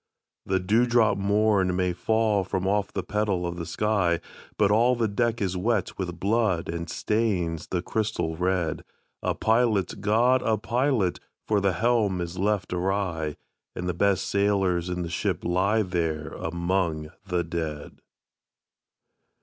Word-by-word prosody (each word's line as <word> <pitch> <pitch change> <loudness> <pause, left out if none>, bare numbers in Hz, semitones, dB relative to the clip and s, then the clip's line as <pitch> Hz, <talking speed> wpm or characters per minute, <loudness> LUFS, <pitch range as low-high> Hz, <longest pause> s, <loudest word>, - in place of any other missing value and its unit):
"The 95 0 +2
dewdrop 110 +3 +3
morn 100 -2 +2
may 90 -1 +1
fall 110 +2 +1
from 95 +1 -2
off 100 +1 +1
the - - -3
petal 100 -3 -1
of 85 0 -4
the 85 -2 -5
sky, 100 -6 +1 0.4
But 100 -1 +3
all 120 +4 +4
the 115 -2 +1
deck 115 +2 0
is 95 -1 -1
wet 105 +2 0
with 85 -2 -4
blood 100 -4 +1
and 85 0 -4
stains 95 -8 -1
the 90 -1 -2
crystal 105 -7 -1
red. 90 -2 -1 0.4
A - - -1
pilot, 110 -5 +1
GOD, 120 +5 +3
a 110 -1 +1
pilot! 120 -3 0 0.3
for 105 -2 +2
the 95 -1 +2
helm 110 -1 +1
is 85 +1 -4
left 100 -2 0
awry, 90 -5 -1 0.4
And 90 - -4
the 90 - 0
best 100 +2 +1
sailors 95 -3 +1
in 90 0 -2
the - - -4
ship 85 - -1
lie 95 +5 +2
there 80 -4 -2
among 85 -2 -2 0.2
the 90 -1 0
dead!" 80 -3 -5
95 Hz, 150 wpm, -26 LUFS, 85-110 Hz, 0.4 s, all